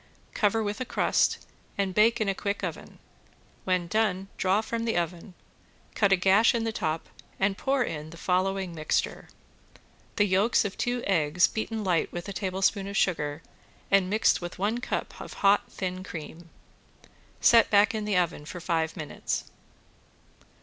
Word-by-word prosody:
Cover 220 +1 +1
with 210 +3 -3
a - - +2
crust - - +1 0.3
and 195 -2 0
bake 225 +4 +4
in 215 - 0
a 195 - +2
quick 200 +1 -3
oven. - - -6 0.7
When 185 -2 +1
done 195 0 0
draw 190 +3 +2
from 230 +1 -3
the 225 - 0
oven, 175 +2 -3 0.6
cut 200 -2 +2
a - - +7
gash 195 +6 +4
in 230 - 0
the 225 - -1
top, 160 -6 -3 0.3
and 195 0 +2
pour 265 +4 +1
in 155 -6 -5
the 170 - -12
following 185 +1 0
mixture: 155 -2 -2 0.9
The 205 - +3
yolks 200 +4 +2
of 200 - -3
two 245 0 -2
eggs 170 -2 +3
beaten 220 0 -3
light 180 -4 +1
with 175 +2 -6
a 200 - -5
tablespoon 195 +1 0
of 200 0 -3
sugar 150 -3 0 0.5
and 195 -2 +4
mixed 215 -1 +2
with 175 0 -6
one 210 +5 0
cup 255 - -4
of - - -8
hot 200 +1 +4
thin 185 -1 -4
cream. 165 -1 -9 0.9
Set 230 -1 +6
back 205 +1 +4
in 215 -1 -2
the 205 -3 +1
oven 175 -4 0
for 175 - -7
five 165 -2 -1
minutes. 150 -2 -4
195 Hz, 165 wpm, -27 LUFS, 175-210 Hz, 0.9 s, a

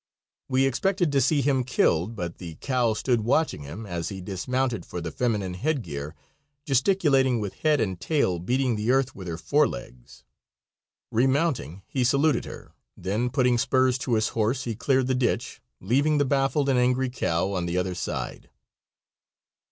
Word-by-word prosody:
We 130 0 +3
expected 175 - +1
to 140 -1 +3
see 145 +3 +3
him 135 -1 +2
killed, 110 -4 +1
but 85 -4 -5
the 85 -3 -8
cow 125 - 0
stood 120 +1 +1
watching 125 - +1
him 85 +11 -8
as 85 -4 -4
he 95 - -6
dismounted 115 +4 -2
for 90 - -6
the 85 -1 -5
feminine 105 -6 -1
headgear, 90 - -3 0.5
gesticulating 135 - +3
with 100 -3 -4
head 155 -2 +3
and 95 -4 -1
tail 140 - +1
and 85 - -9
beating 125 -1 +1
the 105 +2 -2
earth 130 0 +2
with 95 -2 -9
her 85 -1 -4
fore - - +2
legs. - - -10 0.9
Remounting, 130 - 0
he 130 - -1
saluted 140 +1 +2
her, - - -10 0.2
then 105 +7 -1
putting 125 -2 +2
spurs 130 0 +2
to 125 -3 0
his 110 0 +1
horse 115 +4 0
he 115 - -3
cleared 130 +3 +1
the 130 - 0
ditch, 125 -2 -1 0.2
leaving 140 +10 +2
the 145 - +3
baffled 140 +1 +1
and 130 -2 +3
angry 125 +1 +1
cow 90 -5 0
on 90 -2 -1
the 85 +1 -1
other 90 0 -1
side. 85 - -5
125 Hz, 170 wpm, -26 LUFS, 95-135 Hz, 0.9 s, We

